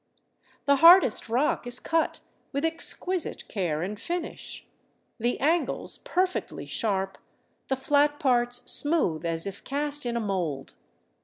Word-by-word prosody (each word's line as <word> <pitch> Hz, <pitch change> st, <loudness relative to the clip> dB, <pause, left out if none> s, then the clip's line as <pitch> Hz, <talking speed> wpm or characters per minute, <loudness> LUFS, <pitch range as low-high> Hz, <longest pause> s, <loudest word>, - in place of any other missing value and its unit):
The 280 Hz, -1 st, +4 dB
hardest 330 Hz, -, +6 dB
rock 245 Hz, +1 st, 0 dB
is 245 Hz, +1 st, 0 dB
cut 325 Hz, -1 st, -1 dB, 0.3 s
with 280 Hz, +2 st, -1 dB
exquisite 335 Hz, +2 st, -1 dB
care 170 Hz, -6 st, -2 dB
and 205 Hz, +3 st, -5 dB
finish, 345 Hz, +7 st, -5 dB, 0.5 s
the 240 Hz, +2 st, -1 dB
angles 325 Hz, +5 st, -1 dB
perfectly 370 Hz, 0 st, -2 dB
sharp, 195 Hz, -3 st, -1 dB, 0.5 s
the 265 Hz, -, 0 dB
flat 290 Hz, +2 st, +2 dB
parts 245 Hz, -3 st, +2 dB
smooth 235 Hz, -, +2 dB
as 165 Hz, 0 st, -1 dB
if 200 Hz, 0 st, -7 dB
cast 290 Hz, -1 st, -1 dB
in 235 Hz, 0 st, -1 dB
a -, -, 0 dB
mould. 180 Hz, -10 st, -3 dB
255 Hz, 130 wpm, -26 LUFS, 200-300 Hz, 0.5 s, hardest